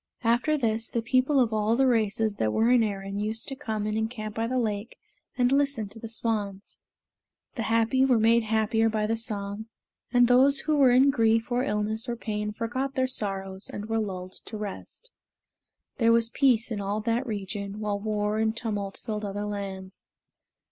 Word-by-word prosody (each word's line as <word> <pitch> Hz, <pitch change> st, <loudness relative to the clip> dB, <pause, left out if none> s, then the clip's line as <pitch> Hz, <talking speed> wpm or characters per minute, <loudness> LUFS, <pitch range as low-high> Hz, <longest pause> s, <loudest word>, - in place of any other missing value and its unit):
After 245 Hz, +7 st, +2 dB
this, 225 Hz, -3 st, 0 dB
the 235 Hz, -, -2 dB
people 260 Hz, +3 st, +2 dB
of 235 Hz, -3 st, +2 dB
all 215 Hz, +1 st, +2 dB
the 270 Hz, +2 st, +3 dB
races 220 Hz, -3 st, +1 dB
that 110 Hz, -1 st, 0 dB
were 225 Hz, -, +2 dB
in 250 Hz, -2 st, +5 dB
Erin 200 Hz, -2 st, -3 dB
used 220 Hz, +2 st, 0 dB
to 270 Hz, -, -5 dB
come 220 Hz, -7 st, -3 dB
and 215 Hz, 0 st, -2 dB
encamp 220 Hz, -1 st, -3 dB
by 225 Hz, +1 st, -2 dB
the 255 Hz, +2 st, -1 dB
lake 215 Hz, -1 st, -2 dB, 0.4 s
and 245 Hz, 0 st, +3 dB
listen 275 Hz, -7 st, +1 dB
to 225 Hz, -, -11 dB
the 225 Hz, -, -7 dB
swans. 210 Hz, -4 st, -3 dB, 0.7 s
The 240 Hz, -, -4 dB
happy 230 Hz, +3 st, +3 dB
were 260 Hz, -3 st, +4 dB
made 230 Hz, +1 st, +4 dB
happier 220 Hz, 0 st, +1 dB
by 215 Hz, -1 st, 0 dB
the 225 Hz, +2 st, 0 dB
song, 210 Hz, -1 st, -4 dB, 0.4 s
and 245 Hz, -1 st, +5 dB
those 270 Hz, +3 st, +5 dB
who 310 Hz, -1 st, 0 dB
were 275 Hz, -3 st, +5 dB
in 260 Hz, +3 st, +5 dB
grief 225 Hz, -1 st, +2 dB
or 245 Hz, +1 st, +1 dB
illness 215 Hz, +2 st, -1 dB
or 240 Hz, -, -1 dB
pain 210 Hz, -2 st, -3 dB
forgot 255 Hz, +6 st, -3 dB
their 260 Hz, -1 st, +2 dB
sorrows 195 Hz, -5 st, -2 dB
and 205 Hz, -, -6 dB
were 225 Hz, 0 st, +1 dB
lulled 185 Hz, -3 st, -5 dB
to 220 Hz, -, -6 dB
rest. 210 Hz, -, -7 dB, 0.9 s
There 230 Hz, -1 st, +4 dB
was 230 Hz, 0 st, +4 dB
peace 240 Hz, -2 st, +2 dB
in 210 Hz, -2 st, -2 dB
all 200 Hz, +2 st, -2 dB
that 235 Hz, +4 st, -1 dB
region, 200 Hz, -1 st, -5 dB
while 205 Hz, -1 st, -2 dB
war 210 Hz, 0 st, -1 dB
and 220 Hz, +1 st, 0 dB
tumult 205 Hz, -4 st, -4 dB
filled 215 Hz, -2 st, -3 dB
other 205 Hz, 0 st, -3 dB
lands. 195 Hz, -2 st, -6 dB
220 Hz, 190 wpm, -27 LUFS, 210-240 Hz, 0.9 s, in